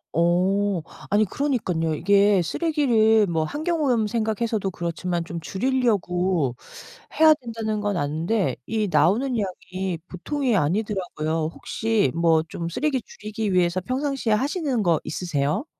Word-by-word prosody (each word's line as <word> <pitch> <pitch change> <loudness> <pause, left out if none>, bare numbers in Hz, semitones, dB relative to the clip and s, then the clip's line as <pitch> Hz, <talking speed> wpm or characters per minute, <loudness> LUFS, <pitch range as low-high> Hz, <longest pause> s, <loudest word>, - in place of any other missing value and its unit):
어. 180 +3 +2 0.3
아니 210 +1 +3
그러니깐요. 185 - -1
이게 200 +3 +4
쓰레기를 225 - +3
뭐 165 -4 0
환경오염 290 - 0
생각해서도 220 -2 -1
그렇지만 170 0 -3
좀 170 0 -5
줄이려고 185 - 0 0.6
해야 315 -1 +8
된다는 225 -5 -4
건 205 -1 -1
아는데 160 - 0
이 215 -2 -1
나오는 200 - +2
양이 185 -3 -4
보통이 255 - -1
아니더라고요. 165 -3 -1
혹시 220 - 0
뭐 165 -1 +3
좀 170 - -4
쓰레기 275 - -1
줄이기 215 -2 -4
위해서 180 0 +2
평상시에 260 0 -1
하시는 275 - 0
거 170 -4 +3
있으세요? 155 - -2
200 Hz, 310 characters per minute, -24 LUFS, 170-235 Hz, 0.6 s, 해야